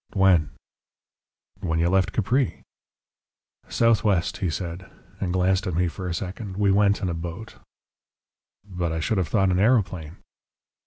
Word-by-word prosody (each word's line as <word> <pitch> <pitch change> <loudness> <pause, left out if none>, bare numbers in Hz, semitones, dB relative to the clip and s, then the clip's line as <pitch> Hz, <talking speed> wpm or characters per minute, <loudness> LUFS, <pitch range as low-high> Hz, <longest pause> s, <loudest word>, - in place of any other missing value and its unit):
"When?" 95 -6 +4 1.1
"When 85 -5 -1
you 85 +1 +2
left 95 +1 +2
Capri." 120 +5 0 1.1
"Southwest," 105 -6 +2
he 95 -4 -1
said, 90 +3 -5 0.3
and 90 - -2
glanced 95 +1 +1
at 90 - -2
me 90 +1 +2
for 90 +3 -6
a 85 - -2
second. 95 +2 -6
"We 100 -1 +3
went 100 0 +3
in 90 - 0
a - - -2
boat." 85 +6 -7 1.1
"But 90 -3 -3
I 80 - -2
should 95 +6 0
have 90 - 0
thought 95 +1 +2
an 90 - +1
aeroplane?" 95 -8 +1
95 Hz, 150 wpm, -24 LUFS, 85-100 Hz, 1.1 s, When